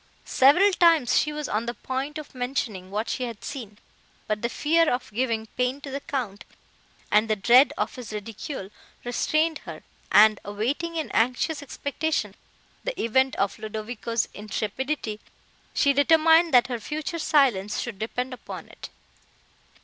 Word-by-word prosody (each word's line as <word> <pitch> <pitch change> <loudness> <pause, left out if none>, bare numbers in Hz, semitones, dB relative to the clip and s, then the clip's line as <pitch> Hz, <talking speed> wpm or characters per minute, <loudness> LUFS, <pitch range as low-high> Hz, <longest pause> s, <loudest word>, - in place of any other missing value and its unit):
Several 325 +10 +5
times 330 -7 +4
she 300 - 0
was 300 -1 -4
on 220 +3 -2
the 240 - -3
point 270 +4 -4
of 305 - -9
mentioning 245 -7 -3
what 210 +3 -2
she 255 - -2
had 230 -4 -8
seen, 225 -7 -7 0.5
but 210 0 -2
the 235 - -1
fear 325 +6 +2
of 245 -3 -3
giving 230 -1 -1
pain 250 +2 0
to 280 - -7
the 275 - -3
Count, 245 -9 -4 0.7
and 215 +2 +4
the 215 - +3
dread 240 +7 +6
of - - -1
his 245 -4 -8
ridicule, 210 0 -6 0.3
restrained 310 +6 0
her; - - -10 0.3
and, 215 -1 +6
awaiting 250 +12 -2
in 320 -2 -3
anxious 255 +7 +1
expectation 285 +3 -2 0.5
the - - -4
event 260 +4 +2
of 195 +1 -1
Ludovico's 220 +1 -3
intrepidity, 215 +3 -3 0.6
she 280 - +4
determined 320 +3 +5
that 245 -1 +6
her 245 -2 -4
future 310 +7 -4
silence 260 -11 +2
should 230 -5 -5
depend 250 +4 -3
upon 255 - -9
it. - - -10
250 Hz, 150 wpm, -25 LUFS, 215-295 Hz, 0.7 s, dread